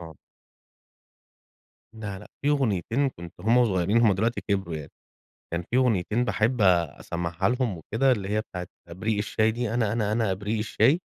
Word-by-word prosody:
آه. 80 -2 -10 1.8
لا، 105 -4 -6
لأ، - - -13
في 145 - +1
أغنيتين 130 - +1
كنت 85 -9 -10
وهمَّ 120 +3 +4
صغيرين 100 +1 +2
همَّ 115 -4 +5
دلوقتي 110 +5 0
كبروا 95 -5 0
يعني، 75 -2 -8 0.6
كان 85 +1 -1
في 120 - +1
أغنيتين 120 -2 +2
باحب 110 +3 0
أسمعها 85 0 +1
لهم 125 -5 0
وكده 115 - +1
اللي 100 -5 -2
هي 105 +1 +1
بتاعة 90 -5 -7 0.2
إبريق 105 +5 -2
الشاي 110 +1 +1
دي، 115 0 -2
أنا، 110 -4 +1
أنا، 105 -2 0
أنا 110 -2 +1
إبريق 105 +4 -2
الشاي، 135 +9 +2
105 Hz, 160 wpm, -26 LUFS, 95-120 Hz, 1.8 s, همَّ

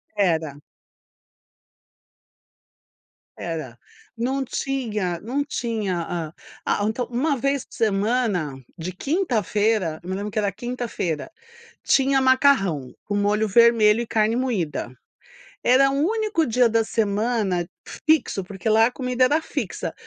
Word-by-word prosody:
Era. 160 -7 0 2.8
Era. 155 -8 -5 0.4
Não 265 +3 -1
tinha 220 -10 -2
não 275 +6 -2
tinha,a 180 - -3 0.3
a 205 - +1
então 230 +3 -1
uma 275 +4 0
vez 275 +1 0
por - - -21
semana 205 - 0 0.2
de 170 +3 -4
quinta-feira, 215 - 0
me 185 +1 -4
lembro 205 +2 -3
que 210 - -8
era 200 -1 0
quinta-feira, 240 - -4 0.5
tinha 270 0 +3
macarrão, 260 - +3
com 205 - -2
molho 210 +1 +1
vermelho 230 0 +5
e 235 - -3
carne 220 +1 +1
moída. 180 - -2 0.7
Era 270 +2 +5
o - - -2
único 410 +3 +1
dia 245 +1 +3
da 225 0 +2
semana 205 -5 0 0.4
fixo, 310 -10 +3
porque 195 +2 -5
lá 220 +1 +5
a - - 0
comida 255 -1 +1
era 300 +5 +2
fixa, - - -4
220 Hz, 120 wpm, -23 LUFS, 190-255 Hz, 2.8 s, vermelho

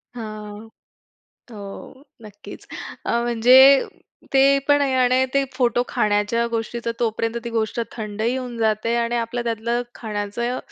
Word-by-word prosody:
हां, 215 -1 -8 0.8
हो, 220 - -10 0.6
नक्कीच. 205 -1 -12 0.4
अ, - - 0
म्हणजे 255 +4 +6 0.5
ते 275 +1 +5
पण 290 0 +5
आहे 275 -2 +1
आणि 255 0 +3
ते 275 - +3
फोटो 245 -1 +1
खाण्याच्या 210 +3 +1
गोष्टीचा 230 +1 -3
तोपर्यंत 230 0 -1
ती 235 - -4
गोष्ट 225 0 -1
थंडही 220 +2 -3
होऊन 250 -2 -5
जाते 220 +1 0
आणि 235 0 0
आपलं 235 +1 -3
त्यातलं 235 +1 -1
खाण्याचं, 220 +3 -3
235 Hz, 130 wpm, -22 LUFS, 220-245 Hz, 0.8 s, म्हणजे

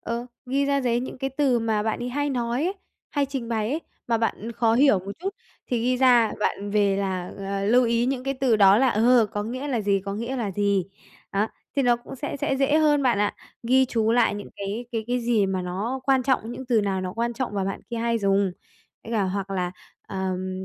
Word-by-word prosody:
Ờ, 235 +1 -4 0.2
ghi 275 +2 +1
ra 280 0 +1
giấy 240 -2 +1
những 260 - -6
cái 270 +1 -2
từ 270 -3 +2
mà 220 -2 0
bạn 220 - -1
ấy 245 - -3
hay 290 +3 -1
nói 245 +2 -1
ấy, 375 +3 -1 0.4
hay 285 -1 0
trình 265 -4 -5
bày 220 0 -1
ấy, 310 - -1 0.3
mà 230 -1 +1
bạn 225 0 -2
khó 230 -1 +2
hiểu 265 -5 +5
một 195 +2 -7
chút 380 +4 -2 0.4
thì 245 -2 -1
ghi 250 +1 +2
ra 245 -3 +5
bạn 205 -1 -1
về 200 -2 +2
là, 185 -2 -2
à, 195 0 -3
lưu 245 +4 +4
ý 235 +1 +1
những 260 -1 -2
cái 275 0 -1
từ 255 -4 +2
đó 200 0 +6
là, 265 +1 +4
ờ, 235 +1 +4
có 205 - -2
nghĩa 255 +6 -4
là 245 -5 0
gì, 200 -1 +1
có 200 0 -3
nghĩa 235 +5 -3
là 220 -5 -2
gì. 200 -1 +1 0.5
Đó, 205 +2 +2 0.3
thì 275 - +3
nó 240 -1 +4
cũng 240 +2 -10
sẽ 285 +2 -4
sẽ 270 0 -1
dễ 275 +2 +3
hơn 295 -2 +3
bạn 245 -5 +2
ạ, 205 0 +1 0.3
ghi 260 +3 +4
chú 225 -2 +1
lại 235 -4 +3
những 205 - -7
cái 200 +5 -4
cái 225 -2 -2
cái 245 0 0
gì 230 -4 +2
mà 190 -1 -1
nó 205 +9 -3
quan 265 -2 +3
trọng, 240 -3 0
những 260 - -7
từ 240 -3 +3
nào 195 -2 -1
nó 185 0 -4
quan 235 +2 -1
trọng 240 -3 -3
và 195 -1 0
bạn 195 - -3
kia 235 - -3
hay 230 0 0
dùng. 195 -2 +2 0.5
Với 230 - -7
cả 215 -3 +2
hoặc 195 +1 -3
là, 180 -2 -1 0.4
ờm, 185 0 -3
230 Hz, 245 wpm, -25 LUFS, 200-255 Hz, 0.5 s, đó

